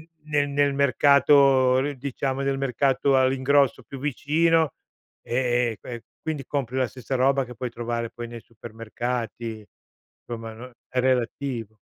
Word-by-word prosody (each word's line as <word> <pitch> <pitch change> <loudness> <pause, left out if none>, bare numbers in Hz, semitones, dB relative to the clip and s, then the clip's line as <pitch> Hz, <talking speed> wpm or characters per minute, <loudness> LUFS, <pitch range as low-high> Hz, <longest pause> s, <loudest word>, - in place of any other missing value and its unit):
n 160 - -16 0.2
nel 145 -1 +2
nel 140 0 +2
mercato 140 -1 +5
r 145 0 -2
diciamo 135 +1 -3
del 135 0 0
mercato 135 +1 +2
all'ingrosso 130 0 +2
più 135 - -9
vicino, 155 +3 +1 0.5
e 120 -1 +1
e 110 - -12
que 120 -2 -8 0.2
quindi 150 -4 -3
compri 130 -3 -3
la 130 -2 +1
stessa 130 +1 -6
roba 135 +1 +3
che 125 - -10
puoi 125 0 -4
trovare 115 0 -3
poi 120 0 -7
nei 120 -1 -8
supermercati. 115 0 -5 0.6
Somma 115 -1 -6
non 125 +3 -11 0.2
è 130 - -3
relativo. 125 -3 -1
130 Hz, 145 wpm, -25 LUFS, 120-140 Hz, 0.6 s, mercato